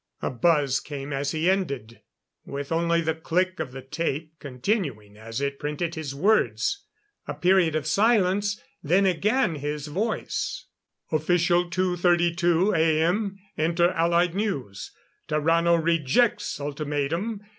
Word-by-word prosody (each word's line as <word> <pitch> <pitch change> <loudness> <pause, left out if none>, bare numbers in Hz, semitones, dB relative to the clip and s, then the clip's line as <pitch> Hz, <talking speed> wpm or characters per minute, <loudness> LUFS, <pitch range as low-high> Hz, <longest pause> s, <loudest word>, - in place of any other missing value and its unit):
"_ - - 0
A - - -2
buzz 140 0 +2
came 145 -1 -6
as 140 +1 -1
he 160 +3 -1
ended, 140 - -1 0.4
with 140 +1 -6
only 170 +1 +2
the 160 0 0
click 180 +4 -1
of 130 - -3
the 135 0 -9
tape 155 +2 -3
continuing 130 - -3
as 115 +2 -6
it 140 0 -2
printed 150 +3 -3
his 155 -4 -5
words. 180 - +1 0.4
A - - -4
period 180 -3 +3
of 155 -2 -1
silence, 200 +2 +2 0.2
then 180 +6 +3
again 195 - +2
his 145 0 -4
voice: 200 +9 -3 0.5
_"Official 175 +2 +2
2:32 175 +1 +2
A. 160 -1 +3
M. 195 +3 0 0.2
Inter 170 +2 +2
Allied 170 0 +2
News: 140 - -3 0.4
Tarrano 165 +3 +3
rejects 170 - +1
Ultimatum. 150 +8 -2
165 Hz, 130 wpm, -25 LUFS, 145-180 Hz, 0.5 s, period